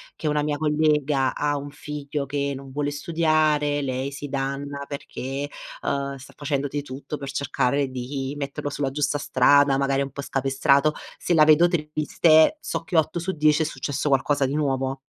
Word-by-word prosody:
che - - -4
una 150 0 +1
mia 150 -1 -1
collega 150 -3 +1
ha 145 0 0
un 145 +1 -6
figlio 145 -1 -5
che 140 0 -2
non 135 0 -10
vuole 145 +1 -1
studiare, 155 -1 +1
lei 130 +1 -2
si 145 +1 -6
danna 140 +1 -3
perché, 140 0 -5 0.3
uhm, 140 0 -2
sta 135 0 -13
facendo 145 -1 -2
di 145 +1 -3
tutto 145 +2 -7
per 140 -1 -7
cercare 140 0 0
di 130 +2 -4
metterlo 140 0 -4
sulla 140 -2 -2
giusta 145 +1 0
strada, 140 0 +4
magari 135 0 +1
è - - +2
un 140 - -6
po' 140 - -6
scapestrato. 140 +2 +2 0.3
Se 175 - 0
la 155 - +7
vedo 155 +3 +6
triste, 155 - +3
so - - -3
che 165 0 -1
8 160 +2 +2
su 190 +3 -3
10 155 0 +3
è - - -2
successo 145 -1 -3
qualcosa 140 +1 +2
di 140 - -2
nuovo. 135 -2 -1
145 Hz, 180 wpm, -24 LUFS, 135-150 Hz, 0.3 s, la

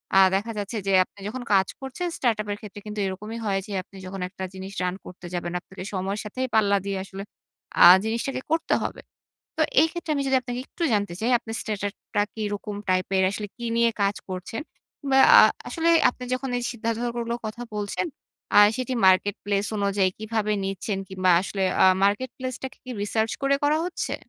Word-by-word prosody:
আ - - +7 0.2
দেখা 220 +4 -1
যাচ্ছে 205 +2 -3
যে - - +2
আপনি 205 - -21
যখন 250 +3 -5
কাজ 190 -1 +4
করছেন 265 +7 -4
startup 220 -4 0
এর 205 - -3
ক্ষেত্রে 205 -1 -9
কিন্তু 210 0 -5
এরকমই 210 +4 -5
হয় 195 -1 +1
যে, - - -9
আপনি 195 - -16
যখন 185 0 -6
একটা 190 0 -8
জিনিস 190 +1 -7
run 180 0 -1
করতে 180 0 -11
যাবেন 175 -1 -3
আপনাকে 190 0 -10
সময়ের 195 +2 -2
সাথে 210 +4 -8 0.2
পাল্লা 200 -2 +4
দিয়ে 195 -1 -2
আসলে 195 0 -8 0.6
আ - - +11 0.2
জিনিসটাকে 235 +4 -2
করতে 325 0 +1
হবে। - - -4 0.6
তো - - +2 0.2
এইক্ষেত্রে 325 0 -1
আমি 280 - 0
যদি 265 - +3
আপনাকে 245 0 -5
একটু 345 - -5
জানতে 205 -4 0
চাই 235 +3 0
আপনার 225 -2 -7
startup 205 -1 -3 0.2
টা 205 - +4
কিরকম 205 -1 -4
টাইপের 185 +1 +2
আসলে 205 0 -4
কী 240 - -6
নিয়ে 235 0 +4
কাজ 200 +1 +2
করছেন। 185 +5 -5 0.8
আ - - +10 0.3
আসলে 335 0 +1 0.2
আপনি 250 - -10
যখন 260 +1 -2
এই 245 - -3
সিদ্ধান্তগুলোর 235 +1 -2
কথা 215 +3 -6
বলছেন 205 - -2 0.5
আ - - +7 0.2
সেটি 255 0 -2
marketplace 200 +2 +2
অনুযায়ী 200 -1 +2
কিভাবে 215 -1 -1
নিচ্ছেন 195 +1 -3
কিংবা, 185 -1 +2
আসলে 195 0 -2 0.2
আ - - +8 0.2
marketplace 255 +5 -1
টাকে 265 - -6
কি 255 - -6
research 220 +2 0
করে 275 0 +3
করা 300 +2 +3
হচ্ছে? 360 - -3
210 Hz, 185 wpm, -25 LUFS, 195-240 Hz, 0.8 s, আ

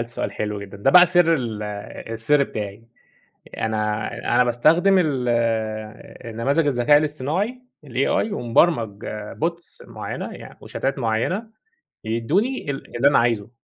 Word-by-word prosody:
ده 115 - -2
سؤال 120 - -4
حلو 105 -1 -3
جدًا، 100 0 -9
ده 100 +7 +2
بقى 180 +2 +8
سر 175 -2 +4
ال 115 -6 -3 0.5
السر 140 +6 +2
بتاعي، 105 -2 -6 0.7
أنا 105 -1 -1 0.3
أنا 125 - +5
باستخدم 165 +11 +4
ال 135 -8 0 1.0
النماذج 140 +8 +1
الذكاء 140 +2 +4
الاصطناعي 155 - -2 0.3
الAI، 215 - 0
ومبرمج 115 - +1 0.3
Bots 170 +2 -5
معيّنة - - -6
يعن - - -11
وشاتات 135 +1 -3
معيّنة 120 - -1 0.6
يدّوني 145 - -1
ال 135 - -8
اللي 135 - +4
أنا 145 - +5
عايزُه 115 -2 0
130 Hz, 130 wpm, -22 LUFS, 115-165 Hz, 1.0 s, بقى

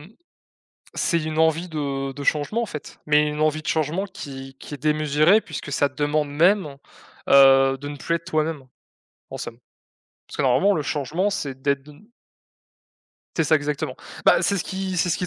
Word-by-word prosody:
mmh, 150 - -14 0.9
c'est 170 -2 +1
une 155 0 -4
envie 160 +2 +2
de 140 -3 -3
de 140 +1 -7
changement 155 +13 0
en - - -2
fait, 150 -7 -9
mais 150 0 +3
une 150 +1 -4
envie 155 0 +1
de - - -11
changement 160 +5 0
qui 135 -9 -9
qui - - -10
est 140 - -8
démesurée 155 +5 +3
puisque 150 -5 -7
ça 140 +1 +2
demande 145 0 -1
même, 170 -4 +2 0.5
heu, 135 -1 +6
de 145 +2 -8
ne 145 - -6
plus 170 +4 -2
être 170 - -6
toi-même, 155 -5 -2 0.6
en - - -7
somme. 115 - -7 0.7
Parce - - -10
que - - 0
normalement 190 +11 +4
le 155 - -1
changement 160 +8 -1
c'est 135 -9 -4
d'être 140 -1 0
de 150 - -14
n 210 +11 -20 1.3
C'est 165 - +3
ça, 155 +1 +4
exactement. 145 -2 -3 0.3
Bah, 170 - +5
c'est 200 +3 +1
ce 175 - -1
qui 190 -1 -4
c'est 180 - +1
ce - - 0
qui 180 - -2
150 Hz, 195 wpm, -23 LUFS, 140-170 Hz, 1.3 s, heu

